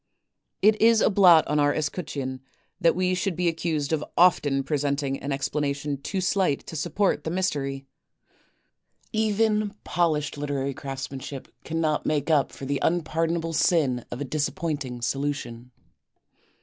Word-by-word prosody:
It 215 Hz, +1 st, +4 dB
is 225 Hz, 0 st, +6 dB
a -, -, +3 dB
blot 180 Hz, -5 st, +7 dB
on 150 Hz, 0 st, +1 dB
our 145 Hz, 0 st, +3 dB
escutcheon 145 Hz, -4 st, -3 dB, 0.4 s
that 170 Hz, -3 st, +3 dB
we 185 Hz, 0 st, +1 dB
should 185 Hz, 0 st, -1 dB
be 175 Hz, +1 st, 0 dB
accused 160 Hz, -3 st, -1 dB
of 150 Hz, -1 st, 0 dB
often 145 Hz, -6 st, +4 dB
presenting 140 Hz, -1 st, -1 dB
an 140 Hz, -, -4 dB
explanation 140 Hz, 0 st, -2 dB
too 190 Hz, +6 st, -3 dB
slight 180 Hz, -5 st, +1 dB
to -, -, -8 dB
support 175 Hz, +1 st, 0 dB
the 160 Hz, -, -3 dB
mystery. 140 Hz, -7 st, -2 dB, 1.3 s
Even 215 Hz, -1 st, +1 dB
polished 155 Hz, -4 st, 0 dB
literary 140 Hz, -1 st, -2 dB
craftsmanship 135 Hz, 0 st, -6 dB
cannot 160 Hz, -2 st, -1 dB
make 150 Hz, +1 st, 0 dB
up 145 Hz, -3 st, +3 dB
for 135 Hz, -, -8 dB
the 140 Hz, +1 st, -1 dB
unpardonable 165 Hz, 0 st, 0 dB
sin 140 Hz, -8 st, +2 dB
of 120 Hz, -, -6 dB
a 145 Hz, -, -3 dB
disappointing 145 Hz, -3 st, -3 dB
solution. 125 Hz, -3 st, -3 dB
150 Hz, 135 wpm, -25 LUFS, 140-175 Hz, 1.3 s, blot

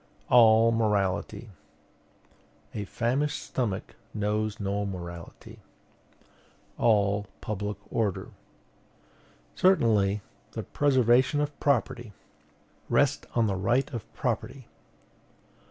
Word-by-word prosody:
"All 115 Hz, -1 st, +7 dB
morality, 105 Hz, 0 st, -1 dB, 0.6 s
" -, -, -34 dB
A 105 Hz, -, -4 dB
famished 130 Hz, +8 st, -1 dB
stomach 105 Hz, -7 st, -3 dB, 0.2 s
knows 105 Hz, +1 st, -1 dB
no 100 Hz, 0 st, -1 dB
morality, 85 Hz, -3 st, -8 dB, 1.2 s
"All 105 Hz, -2 st, +2 dB
public 105 Hz, 0 st, -4 dB
order, 105 Hz, -5 st, -1 dB, 0.6 s
" -, -, -32 dB
Certainly, 105 Hz, -, +3 dB, 0.3 s
the -, -, -4 dB
preservation 130 Hz, 0 st, +3 dB
of 145 Hz, -1 st, -3 dB
property, 120 Hz, -5 st, 0 dB, 0.8 s
"Rest -, -, +2 dB
on 115 Hz, -1 st, +3 dB
the 100 Hz, -, 0 dB
right 120 Hz, +9 st, 0 dB
of 115 Hz, -4 st, -6 dB
property." -, -, -3 dB
110 Hz, 90 wpm, -27 LUFS, 100-120 Hz, 1.2 s, All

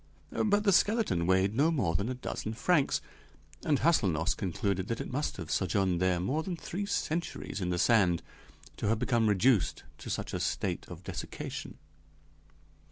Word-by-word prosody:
But 205 Hz, -1 st, +2 dB
the 200 Hz, -2 st, +4 dB
skeleton 205 Hz, -, +2 dB
weighed 95 Hz, +2 st, +3 dB
no 145 Hz, +7 st, +3 dB
more 110 Hz, -, +1 dB
than 100 Hz, +8 st, 0 dB
a 130 Hz, -, -2 dB
dozen 110 Hz, -3 st, -4 dB
francs, 155 Hz, +3 st, +2 dB, 0.6 s
and 145 Hz, -4 st, +1 dB
Hâselnoss 95 Hz, -, +2 dB
concluded 95 Hz, 0 st, -1 dB
that 115 Hz, -, -2 dB
it -, -, -5 dB
must 145 Hz, +4 st, -2 dB
have 85 Hz, -4 st, -6 dB
sojourned 95 Hz, -1 st, +1 dB, 0.2 s
more 140 Hz, +11 st, 0 dB
than 180 Hz, +2 st, -4 dB
three 200 Hz, +5 st, -4 dB
centuries 170 Hz, -, -2 dB
in 90 Hz, -, -1 dB
the 90 Hz, -, 0 dB
sand 90 Hz, -5 st, +3 dB, 0.5 s
to -, -, -2 dB
have 110 Hz, +2 st, +2 dB
become 115 Hz, -2 st, +2 dB
reduced 105 Hz, -3 st, +2 dB, 0.2 s
to -, -, -8 dB
such -, -, -3 dB
a -, -, -1 dB
state -, -, -2 dB
of -, -, -10 dB
desiccation. -, -, -6 dB
110 Hz, 165 wpm, -30 LUFS, 95-155 Hz, 0.6 s, the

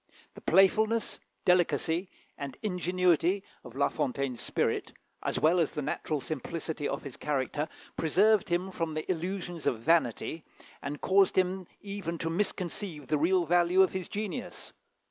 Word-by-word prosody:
The -, -, -12 dB
playfulness, 215 Hz, +5 st, +3 dB, 0.3 s
delicacy, 180 Hz, 0 st, +2 dB, 0.3 s
and 140 Hz, -2 st, -6 dB
ingenuity 180 Hz, -1 st, +2 dB, 0.2 s
of 125 Hz, -, -11 dB
La 140 Hz, -, +3 dB
Fontaine's 130 Hz, -2 st, -2 dB
spirit, -, -, -1 dB, 0.3 s
as -, -, -1 dB
well 170 Hz, +3 st, +4 dB
as 165 Hz, -, +1 dB
the 150 Hz, -, -2 dB
natural 150 Hz, +2 st, -2 dB
simplicity 155 Hz, +2 st, -3 dB
of -, -, -3 dB
his 140 Hz, -3 st, -8 dB
character, 145 Hz, +1 st, -1 dB, 0.3 s
preserved 205 Hz, +6 st, +3 dB
him 180 Hz, +2 st, 0 dB
from 165 Hz, -3 st, -3 dB
the 155 Hz, -, -3 dB
illusions 175 Hz, -1 st, -3 dB
of 120 Hz, -, +2 dB
vanity, 160 Hz, +1 st, +1 dB, 0.4 s
and 145 Hz, +1 st, -5 dB
caused 195 Hz, 0 st, +4 dB
him 185 Hz, 0 st, +1 dB, 0.2 s
even 195 Hz, -4 st, -4 dB
to 165 Hz, 0 st, -2 dB
misconceive 175 Hz, -5 st, -2 dB
the 150 Hz, -, +2 dB
real 175 Hz, +3 st, +3 dB
value 175 Hz, +3 st, +5 dB
of 190 Hz, -, +1 dB
his 185 Hz, -1 st, -4 dB
genius. 205 Hz, -5 st, -5 dB
170 Hz, 145 wpm, -30 LUFS, 155-190 Hz, 0.4 s, value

